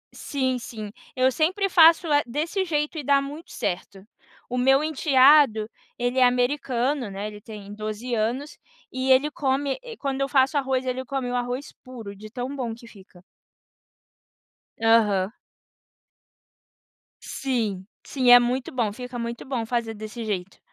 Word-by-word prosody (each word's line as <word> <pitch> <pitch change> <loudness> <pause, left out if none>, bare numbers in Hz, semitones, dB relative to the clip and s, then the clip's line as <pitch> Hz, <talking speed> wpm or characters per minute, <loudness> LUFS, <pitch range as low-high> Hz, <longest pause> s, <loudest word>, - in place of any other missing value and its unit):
Sim, 260 -3 -2
sim, 215 -3 -7 0.2
eu 260 0 +3
sempre 370 +8 +1
faço, 335 0 +6
eh, 290 - +5
desse 320 +10 -1
jeito 300 -1 -1
e 295 - -5
dá 280 +1 +4
muito 290 +4 -8
certo. 190 +2 -4 0.4
O 250 - -3
meu 270 +3 +4
enteado, 275 -6 +4 0.3
ele 245 +2 0
é 255 - +6
americano, 250 0 +1
né, 195 +1 -5
ele 210 -1 -9
tem 205 -2 -10
12 215 +3 -5
anos, 235 +7 -2 0.3
e 260 0 0
ele 275 +3 +4
come, 275 - -1
eh, 470 -3 -9
quando 275 -1 -3
eu 275 - 0
faço 270 +1 +3
arroz, 265 -2 0
ele 255 0 -2
come 260 -1 -3
o - - -2
arroz 245 +3 -3
puro, 230 -6 -9
de 215 +2 -11
tão 250 +4 -5
bom 240 -4 -3
que 235 0 -15
fica. 190 -4 -17 1.6
Aham. 210 -4 +3 1.9
Sim, 220 -8 -3 0.2
sim. 255 -3 +1
É 245 - +11
muito 250 +2 -1
bom. 230 -5 0
Fica 250 +2 -7
muito 235 0 -5
bom 255 -4 -2
fazer 230 -1 -2
desse 215 +2 -7
jeito. 195 -3 -4
250 Hz, 155 wpm, -24 LUFS, 225-275 Hz, 1.9 s, É